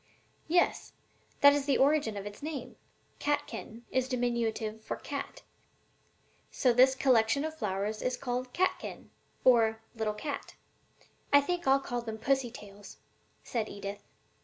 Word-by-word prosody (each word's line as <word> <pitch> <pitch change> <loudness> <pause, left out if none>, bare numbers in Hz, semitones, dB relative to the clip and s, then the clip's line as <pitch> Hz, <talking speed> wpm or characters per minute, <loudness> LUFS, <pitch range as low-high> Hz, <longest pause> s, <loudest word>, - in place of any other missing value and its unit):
"Yes, 350 +2 +1 0.4
and - - -33
that 285 0 +9
is 285 -1 -2
the 280 - +3
origin 275 -6 +3
of 200 - -5
its 205 0 -8
name. 280 -5 -5 0.4
'Catkin' 250 -5 -3
is 260 0 +1
diminutive 230 -3 -1
for - - -4
'cat;' 280 -1 -6 1.1
so 250 -2 +2
this 260 +2 +6
collection 260 +1 +3
of 315 0 -4
flowers 210 -3 -2
is 255 0 -1
called 250 -1 -3
'catkin,' 370 +7 -2 0.3
or 225 -3 +5
'little 220 -2 -2
cat.'" 280 +7 -5 0.8
"I 285 - +8
think 345 +3 -2
I'll 270 +1 +5
call 245 -3 -3
them 220 -2 -5
'pussy 265 +2 +1
tails,'" 205 -3 -12 0.5
said 230 -4 -2
Edith. 200 0 -6
245 Hz, 140 wpm, -30 LUFS, 220-280 Hz, 1.1 s, that